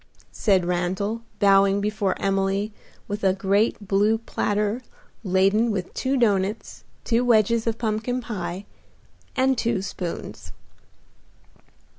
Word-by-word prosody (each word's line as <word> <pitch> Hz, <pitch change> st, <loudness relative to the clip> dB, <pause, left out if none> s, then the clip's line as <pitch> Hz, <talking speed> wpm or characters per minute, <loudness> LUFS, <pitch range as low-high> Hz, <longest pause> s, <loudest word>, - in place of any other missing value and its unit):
said 190 Hz, -4 st, +2 dB
Randal, 185 Hz, +5 st, -1 dB, 0.2 s
bowing 195 Hz, -1 st, +4 dB
before 205 Hz, -1 st, -1 dB
Emily 195 Hz, +2 st, 0 dB, 0.3 s
with 205 Hz, +1 st, -4 dB
a 190 Hz, -1 st, +4 dB
great 200 Hz, +2 st, +1 dB
blue 205 Hz, +3 st, +3 dB
platter 210 Hz, 0 st, -1 dB, 0.4 s
laden 195 Hz, +4 st, +3 dB
with 190 Hz, -4 st, -3 dB
two 270 Hz, +1 st, 0 dB
doughnuts, 205 Hz, -3 st, 0 dB, 0.2 s
two 235 Hz, +1 st, +1 dB
wedges 230 Hz, -1 st, +3 dB
of 225 Hz, -1 st, 0 dB
pumpkin 225 Hz, +2 st, -1 dB
pie 200 Hz, -5 st, -5 dB, 0.7 s
and 265 Hz, 0 st, +3 dB
two 225 Hz, -5 st, 0 dB
spoons. 180 Hz, -3 st, -6 dB
205 Hz, 110 wpm, -24 LUFS, 195-225 Hz, 0.7 s, bowing